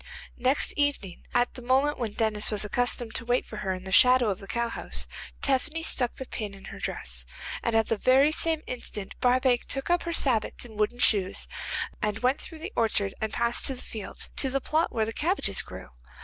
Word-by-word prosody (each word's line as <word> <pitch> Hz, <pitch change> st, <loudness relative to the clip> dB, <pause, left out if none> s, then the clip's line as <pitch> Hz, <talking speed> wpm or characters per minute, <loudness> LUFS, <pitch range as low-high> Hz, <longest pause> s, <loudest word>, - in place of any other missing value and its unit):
Next 255 Hz, +3 st, +2 dB
evening, 285 Hz, -11 st, -1 dB
at 245 Hz, 0 st, +2 dB
the 255 Hz, -, -10 dB
moment 265 Hz, +4 st, +2 dB
when 225 Hz, -4 st, -2 dB
Denis 215 Hz, -2 st, 0 dB
was 210 Hz, -1 st, -2 dB
accustomed 240 Hz, +1 st, 0 dB
to -, -, -2 dB
wait 245 Hz, +1 st, +1 dB
for -, -, -9 dB
her 190 Hz, -, -2 dB
in 185 Hz, 0 st, -4 dB
the 190 Hz, -, -6 dB
shadow 250 Hz, +2 st, +6 dB
of 190 Hz, -, -2 dB
the 195 Hz, -, -10 dB
cowhouse, 235 Hz, +1 st, -1 dB, 0.4 s
Tephany 305 Hz, +4 st, +1 dB
stuck 245 Hz, -6 st, +1 dB
the 265 Hz, -, -6 dB
pin 210 Hz, -5 st, -5 dB
in 195 Hz, -, -13 dB
her -, -, -9 dB
dress, -, -, -4 dB, 0.4 s
and 230 Hz, -, 0 dB
at 225 Hz, 0 st, +4 dB
the 225 Hz, -1 st, -1 dB
very 270 Hz, +6 st, +5 dB
same 320 Hz, 0 st, +1 dB
instant 210 Hz, -5 st, -6 dB
Barbaik 250 Hz, 0 st, +3 dB
took 270 Hz, +5 st, 0 dB
up 350 Hz, -, +3 dB
her 340 Hz, -, -3 dB
sabots 245 Hz, -8 st, +1 dB
or 240 Hz, -, -11 dB
wooden 210 Hz, +3 st, 0 dB
shoes 200 Hz, -6 st, +2 dB, 0.5 s
and 210 Hz, 0 st, 0 dB
went 250 Hz, +5 st, +1 dB
through 325 Hz, -, -9 dB
the 355 Hz, +7 st, -6 dB
orchard 205 Hz, -3 st, +1 dB
and 220 Hz, -1 st, -1 dB
past 235 Hz, 0 st, +2 dB
to 270 Hz, -, 0 dB
the 250 Hz, -, -8 dB
fields, 215 Hz, -3 st, -3 dB
to 270 Hz, -, +2 dB
the 275 Hz, +1 st, 0 dB
plot 315 Hz, +5 st, 0 dB
where 220 Hz, -2 st, 0 dB
the 225 Hz, -, -4 dB
cabbages 350 Hz, -, +1 dB
grew. -, -, -10 dB
245 Hz, 210 wpm, -27 LUFS, 215-270 Hz, 0.5 s, shadow